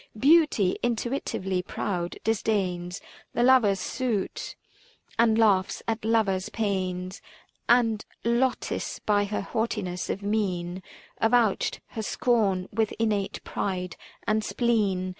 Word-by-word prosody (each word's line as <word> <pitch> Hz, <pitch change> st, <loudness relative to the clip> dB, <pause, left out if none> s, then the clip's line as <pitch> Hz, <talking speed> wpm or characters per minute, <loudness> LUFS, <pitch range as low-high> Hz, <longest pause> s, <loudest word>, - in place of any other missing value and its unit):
Beauty, 280 Hz, -, +4 dB
intuitively 230 Hz, -6 st, -1 dB
proud, 180 Hz, -1 st, -3 dB
disdains 190 Hz, -5 st, -1 dB, 0.3 s
The 240 Hz, -, +1 dB
lover's 240 Hz, -7 st, +5 dB
suit 225 Hz, 0 st, -2 dB, 0.6 s
and 225 Hz, -1 st, +4 dB
laughs 200 Hz, -4 st, +3 dB
at 225 Hz, -1 st, -1 dB
lover's 215 Hz, -4 st, +1 dB
pains; 185 Hz, -3 st, -2 dB, 0.5 s
And, 230 Hz, -3 st, +4 dB, 0.2 s
Lotis 240 Hz, +2 st, 0 dB
by 205 Hz, -1 st, +1 dB
her 205 Hz, +1 st, -2 dB
haughtiness 195 Hz, -4 st, -2 dB
of 200 Hz, -, -3 dB
mien 190 Hz, -4 st, -1 dB, 0.4 s
Avouched 225 Hz, -2 st, +2 dB
her 220 Hz, -, -5 dB
scorn 205 Hz, -5 st, +1 dB
with 220 Hz, 0 st, 0 dB
innate 210 Hz, -3 st, -1 dB
pride 180 Hz, -3 st, -3 dB, 0.3 s
and 215 Hz, 0 st, +1 dB
spleen. 205 Hz, -7 st, +1 dB
210 Hz, 105 wpm, -27 LUFS, 185-230 Hz, 0.6 s, lover's